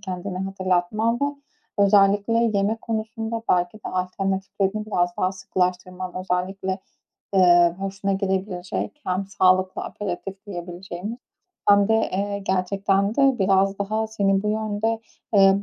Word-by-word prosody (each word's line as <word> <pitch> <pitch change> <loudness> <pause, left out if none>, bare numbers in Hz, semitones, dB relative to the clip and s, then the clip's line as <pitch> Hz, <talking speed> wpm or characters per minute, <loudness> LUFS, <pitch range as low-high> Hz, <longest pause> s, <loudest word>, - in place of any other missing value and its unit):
kendine 185 -1 -5
hatırlatman 190 +3 0
ve - - +3 0.5
özellikle 200 +1 +4 0.3
yeme 205 +3 +1
konusunda 225 0 -4
belki 180 +2 +2
de - - -7
alternatiflerini 195 +2 -2
biraz 175 -4 0
daha 185 +1 +1
sıkılaştırman 185 -1 -2
Özellikle, 190 +1 -2 0.6
ııı, 175 -2 +6
hoşuna 195 0 -2
gidebilecek 190 +5 -2
hem 185 +1 -1
sağlıklı 185 -1 +2
aperitif 195 +1 -6
diyebileceğimiz 180 +3 -6 0.5
hem 200 0 +6
de, 225 - +4 0.2
eee, 200 +1 -1
gerçekten 195 +1 0
de 275 -2 +4
biraz 195 0 +3
daha 215 +2 -1
seni 195 -3 +1
bu 210 - -1
yönde, 215 +1 -1 0.4
ııı, 195 0 +6
195 Hz, 120 wpm, -23 LUFS, 185-205 Hz, 0.6 s, ııı